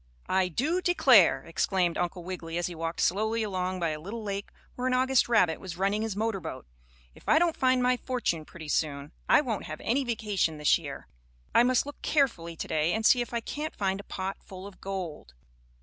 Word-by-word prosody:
"I 190 -1 +3
do 295 - 0
declare!" 265 - +5
exclaimed 175 +1 0
Uncle 175 0 -2
Wiggily, 170 -2 -5
as 175 - 0
he 175 - -4
walked 165 0 -3
slowly 220 +4 +1
along 185 -2 -2
by 170 -2 0
a 155 -1 -4
little 210 +8 -6
lake, 200 -1 -4 0.2
where 250 +1 -2
an 255 - +2
August 260 -1 +3
rabbit 180 -9 +3
was 175 -2 -7
running 200 +3 +1
his 220 -3 -2
motor 220 -1 -1
boat, - - -7 0.5
"if - - -10
I 310 - +6
don't 335 0 +3
find 255 -1 +2
my 250 0 +3
fortune 240 -12 -2
pretty 160 0 -11
soon 145 -1 -1 0.2
I - - +7
won't 230 -8 -3
have 155 0 -6
any 265 +5 +1
vacation 210 -9 -1
this 150 -1 +3
year. - - -8 0.5
I - - +6
must 250 +1 +3
look 290 - -9
carefully 210 - 0
to - - -5
day, 155 +2 +1
and 220 0 -1
see 245 - +6
if 240 - -4
I 235 -1 -1
can't 300 +6 -5
find 195 -1 -1
a - - -8
pot 190 +1 -4
full 185 0 -10
of 200 -1 -12
gold." 180 - -6
195 Hz, 210 wpm, -28 LUFS, 170-245 Hz, 0.5 s, I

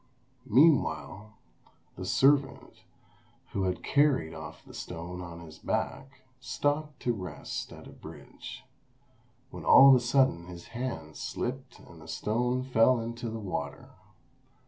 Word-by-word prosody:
Meanwhile, 120 - +3 0.6
the 95 - -6
servant, 135 +5 +2 0.7
who 95 -1 -1
had 90 -1 -2
carried 140 - +2
off - - -9
the - - -14
stone 90 +1 -6
on 85 -1 -8
his 80 -2 -12
back, 135 0 -3 0.2
stopped 145 +2 -2
to 120 - +1
rest 90 -7 -6
at - - -11
a - - -11
bridge; - - -11 0.9
when - - -8
all 135 +1 +9
of - - +9
a - - +4
sudden 120 -8 +2
his 85 -1 -10
hand 100 - -5
slipped 130 0 -4
and 80 -2 -15
the 75 - -13
stone 125 +9 -1
fell 125 -1 +4
into 115 +1 -5
the 115 - -5
water. 100 -5 -5
115 Hz, 135 wpm, -29 LUFS, 90-130 Hz, 0.9 s, all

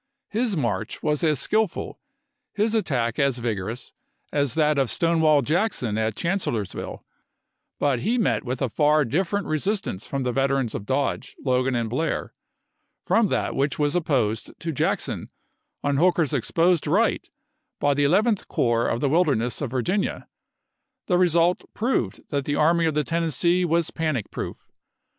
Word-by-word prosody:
His 220 -3 0
march 115 -5 -2
was 150 0 0
as 155 -4 +2
skillful, 215 -4 -1 0.6
his 215 +2 +1
attack 125 - 0
as 140 -3 +2
vigorous, 115 0 -4 0.4
as 145 -4 +1
that 150 -2 +3
of 135 -3 +1
Stonewall 160 -4 +3
Jackson 155 - 0
at 110 -1 -1
Chancellorsville; 145 - -3 0.7
but 140 -4 +1
he 230 - 0
met 225 - +1
with 130 0 -3
a 130 - 0
far 150 +4 +3
different 190 - -1
resistance 155 - -2
from 140 -1 -2
the 125 - 0
veterans 135 -2 0
of 100 - -5
Dodge, 135 +1 -1
Logan, 130 0 +1
and 115 -1 0
Blair, 130 +9 -2 0.7
from 225 -2 +3
that - - -1
which 140 +1 0
was 145 -1 +1
opposed 130 -11 0
to 165 - -3
Jackson 140 - -1 0.5
on 145 -1 +1
Hooker's 170 -2 +2
exposed 165 +7 +2
right - - +1 0.5
by 145 - +3
the 145 +1 +1
Eleventh 205 +7 +2
Corps 120 -1 +1
in - - 0
the 140 - +2
Wilderness 140 -8 +1
of 140 - -2
Virginia. 175 - -1 0.8
The 180 -2 +2
result 175 0 +3
proved 215 - -1
that 140 -2 -1
the 145 - -1
Army 165 +2 +3
of 155 - -1
the 150 - +2
Tennessee 170 +3 +1
was 170 -1 +1
panic 155 -9 -2
proof. - - -6
150 Hz, 150 wpm, -24 LUFS, 125-170 Hz, 0.8 s, that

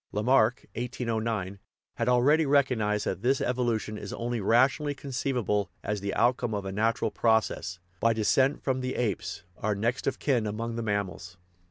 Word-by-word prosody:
Lamarck 120 +2 +2
(1809) 115 -5 -3 0.4
had 115 +1 0
already 145 +6 +4
recognized 125 -7 +2
that 95 - -2
this 130 +3 +2
evolution 115 -4 -1
is - - -7
only 120 -1 -3
rationally 135 +7 +3
conceivable 125 -7 -1 0.2
c.s 105 -1 -1
the 100 0 -3
outcome 120 -2 +2
of 100 -1 -3
a 95 - -3
natural 110 +2 0
process, 110 -5 +1 0.2
by 115 - +3
"descent 130 +5 +2
from 130 -1 0
the 130 0 -3
apes," 110 -7 -2 0.2
our 105 -1 0
next 115 +6 -1
of 135 - 0
kin 125 -7 +1
among 115 +2 -3
the 115 - -2
mammals. 100 -4 -3
115 Hz, 160 wpm, -28 LUFS, 105-125 Hz, 0.4 s, already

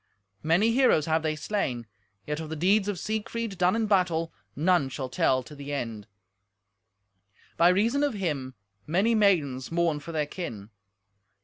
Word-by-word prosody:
Many 175 +9 +3
heroes 240 - +3
have 160 0 +1
they 155 -1 -1
slain, 140 - -2 0.4
yet 150 +1 -3
of 160 -1 -6
the 160 - -4
deeds 195 +6 +2
of 205 -3 -2
Siegfried, 220 0 -4
done 180 +3 +3
in 225 -1 +1
battle, 180 -5 +1 0.2
none 160 -2 +2
shall 130 0 -5
tell 130 +1 +1
to 120 - -12
the 140 0 -8
end. 115 -7 -4 1.5
By 170 +1 +5
reason 230 +10 +2
of 285 -6 0
him 145 -9 -3 0.3
many 195 +9 +2
maidens 165 - +2
mourn 165 -3 +1
for 150 +3 -8
their 155 -2 0
kin. 115 - -7
165 Hz, 155 wpm, -27 LUFS, 145-200 Hz, 1.5 s, By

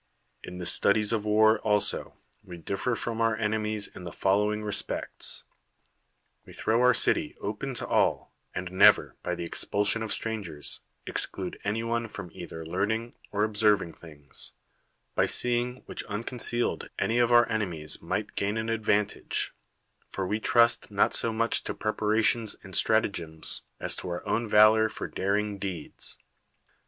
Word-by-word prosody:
In 90 0 -8
the 90 - -5
studies 100 +4 +3
of 110 -2 -1
war 110 +1 +4
also 105 -1 +1 0.3
we 90 - -10
differ 100 +8 -2
from 115 0 -2
our 115 -1 +2
enemies 110 -1 0
in 95 - -11
the 85 - -6
following 105 +2 +1
respects: 105 -1 0 1.0
AVe - - -12
throw 115 +2 +1
our 125 -1 +5
city - - +2
open - - -4
to - - -1
all, - - +1 0.2
and 90 0 -4
never, 95 +2 +5
by 90 - -2
the 85 - -5
expulsion 100 +5 +1
of 110 -2 -3
strangers, 100 -10 -2 0.2
exclude - - -4
anyone 115 +3 -1
from 95 -5 -8
either 80 0 -8
learn 95 +5 -1
ing 115 +2 -2 0.2
or 105 0 0
observing 105 -5 +2
things, 75 -3 -8 0.6
by - - +2
seeing 125 +1 0
which - - -5
uncon 115 +4 -5
cealed 120 +1 -1
any 115 +2 +1
of 120 0 +3
our 120 -1 +7
enenncs 90 -10 -1
might - - -3
gain 100 +2 -1
an 110 0 -2
advan 105 -2 +2
tage; - - -2 0.5
for 95 - -4
we 105 +4 -1
trust 120 +1 +3
not - - +2
so 115 - +1
much 115 +1 0
to - - -4
preparations 110 +1 +2
and 95 -2 -8
stratagems, 85 -8 +2 0.2
as - - -1
to - - -6
our 85 0 -4
ovrn 115 +1 -1
valor 110 +1 +6
for - - -5
daring 100 +1 -1
deeds. 90 -6 -4
105 Hz, 155 wpm, -28 LUFS, 95-115 Hz, 1.0 s, our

